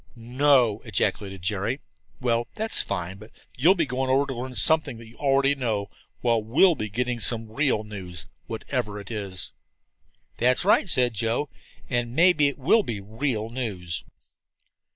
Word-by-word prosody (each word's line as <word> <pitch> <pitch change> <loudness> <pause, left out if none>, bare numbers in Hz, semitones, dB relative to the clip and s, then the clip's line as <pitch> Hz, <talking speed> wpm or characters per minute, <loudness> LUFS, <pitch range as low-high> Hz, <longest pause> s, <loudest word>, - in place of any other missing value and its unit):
"No!" 125 -2 +2
ejaculated 95 -3 -1
Jerry. 105 +7 -1 0.4
"Well, 120 -2 0
that's 220 +1 0
fine. 95 0 -4
But 110 +1 -12 0.3
you'll 165 +10 +5
be 170 -4 +1
going 130 0 -2
over 135 +2 +3
to 135 - -4
learn 125 +1 -6
something 155 -5 +3
that 115 - -11
you 115 +1 -16
already 140 0 +3
know, 110 -7 -2 0.3
while 115 -2 +2
we'll 140 - +4
be 110 -8 -4
getting 125 +3 -2
some 115 -1 +3
real 130 -3 +1
news, 95 -5 -6 0.2
whatever 105 -1 -3
it 100 +1 -9
is." 100 -5 -3 0.8
"That's 125 +7 +2
right," 200 -1 +4
said 125 -6 +2
Joe. 115 +6 -1 0.4
"And 120 -1 -2
maybe 165 -3 +5
it 140 - -3
will 145 - +4
be 115 - -4
real 110 +2 -3
news." 100 -9 -4
120 Hz, 155 wpm, -25 LUFS, 105-135 Hz, 0.8 s, you'll